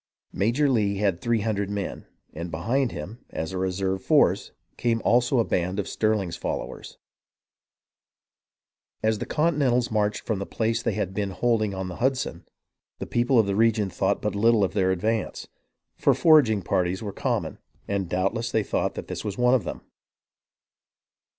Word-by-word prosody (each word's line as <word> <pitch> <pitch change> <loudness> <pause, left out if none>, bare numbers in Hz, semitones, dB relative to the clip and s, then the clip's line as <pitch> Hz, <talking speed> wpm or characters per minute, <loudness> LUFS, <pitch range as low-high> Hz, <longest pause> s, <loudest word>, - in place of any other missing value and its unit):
Major 120 +9 +2
Lee 105 -6 +2
had 100 -4 0
three 115 -2 +1
hundred 100 -2 -1
men; 100 -2 -4 0.3
and 85 +2 -5
behind 115 +11 0
him, 95 +12 -8
as 80 +3 -4
a 95 - -3
reserve 95 +1 -1
force, - - +3 0.2
came 115 -1 0
also 125 +3 +3
a 115 - +4
band 90 +2 -1
of 100 - -2
Stirling's 105 -6 0
followers. - - -5 2.1
As 110 -1 +1
the - - -4
Continentals 140 -7 +1
marched 105 -1 0
from 110 -4 -2
the 100 - -4
place 115 0 -1
they - - -1
had 95 -3 -2
been 100 0 -1
holding 110 0 0
on 95 0 -4
the 90 - -7
Hudson, 130 +1 -1 0.5
the - - -5
people 120 +2 +1
of 110 - +5
the 100 -1 -1
region 110 -2 +2
thought - - 0
but - - 0
little 110 +1 +3
of 95 -1 0
their 95 -2 +2
advance, 105 +5 -1 0.5
for - - +4
foraging 135 - +5
parties 90 +5 0
were 100 -2 -5
com - - -1
mon, - - -8 0.3
and 100 -3 -2
doubtless 95 +7 -1
they 110 - +1
thought - - -1
that - - -5
this - - -5
was 105 -2 -4
one 125 0 +4
of 120 -8 +2
them. - - -5
105 Hz, 170 wpm, -25 LUFS, 95-120 Hz, 2.1 s, of